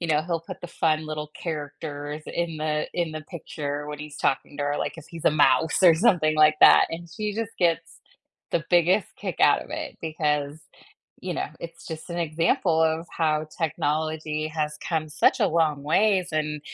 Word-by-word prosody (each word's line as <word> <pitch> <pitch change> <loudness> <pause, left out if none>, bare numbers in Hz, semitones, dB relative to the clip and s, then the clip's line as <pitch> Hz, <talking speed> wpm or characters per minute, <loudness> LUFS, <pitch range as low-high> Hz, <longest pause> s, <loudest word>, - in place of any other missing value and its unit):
you 170 - -3
know, 155 -1 +2
he'll 170 0 -2
put 165 - -9
the - - -6
fun 155 -2 0
little 150 -1 -5
characters 150 -1 -5
in 170 -2 -3
the 150 0 -1
in 170 -3 -1
the 155 - -5
picture 145 -4 -5
when 150 0 -6
he's 150 0 -8
talking 145 +1 -1
to 145 - -2
her, 145 0 0
like, - - -3
if 160 - -11
he's 165 -2 -9
a - - +6
mouse 150 +3 +3
or 170 -2 +8
something 160 -4 +3
like 155 0 +5
that, - - +8
and 170 +1 -6
she 210 +5 -4
just 225 0 -4
gets 165 -2 0 0.5
the 165 - 0
biggest 175 +3 +4
kick - - -5
out - - +5
of - - -16
it - - -5
because, 150 -2 -1 0.6
you - - -4
know, - - -2
it's 170 0 -9
just 160 +1 -7
an 170 - -3
example 165 +1 +1
of 160 +1 +1
how 155 -1 +1
technology 155 0 -1
has 150 -1 -2
come 160 -2 -1
such 150 - +2
a - - +4
long 155 -3 +1
ways 190 +5 +2
and 150 -1 -1
155 Hz, 195 wpm, -25 LUFS, 150-170 Hz, 0.6 s, or